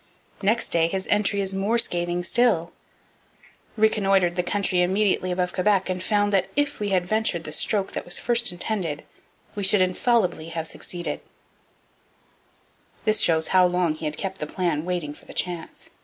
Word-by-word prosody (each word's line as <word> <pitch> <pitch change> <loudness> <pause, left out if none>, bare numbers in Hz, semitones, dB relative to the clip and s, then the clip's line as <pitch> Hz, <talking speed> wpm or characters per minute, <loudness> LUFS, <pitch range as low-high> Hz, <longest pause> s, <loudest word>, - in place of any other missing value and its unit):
Next 215 +4 +2
day, 165 -1 +3
his 190 +2 -3
entry 205 -1 +2
is 195 0 -2
more 200 +5 0
scathing 175 -5 0
still: 190 -4 +2 1.1
'Reconnoitred 195 -5 +2
the 180 - +1
country 185 0 0
immediately 190 0 +1
above 180 0 -1
Quebec 195 0 +1
and 185 0 -4
found 205 0 +1
that 190 -2 +2
if 290 0 0
we 205 -1 -2
had 185 -2 +1
ventured 215 -4 0
the 155 - -7
stroke 195 +5 0
that - - -4
was 175 - +2
first 235 -3 +2
intended 175 -5 -3 0.5
we 205 - -4
should 200 +1 +4
infallibly 185 -2 +1
have 165 -1 -4
succeeded.' 175 +1 -5 1.8
This 215 0 +3
shows 160 -1 +2
how 185 -1 +5
long 180 -2 +1
he 155 +1 -7
had 150 0 -3
kept 190 -1 -5
the 150 - -4
plan 170 -3 -2
waiting 175 -5 -3
for - - -17
the - - -12
chance. 175 -2 -4
185 Hz, 170 wpm, -24 LUFS, 175-205 Hz, 1.8 s, how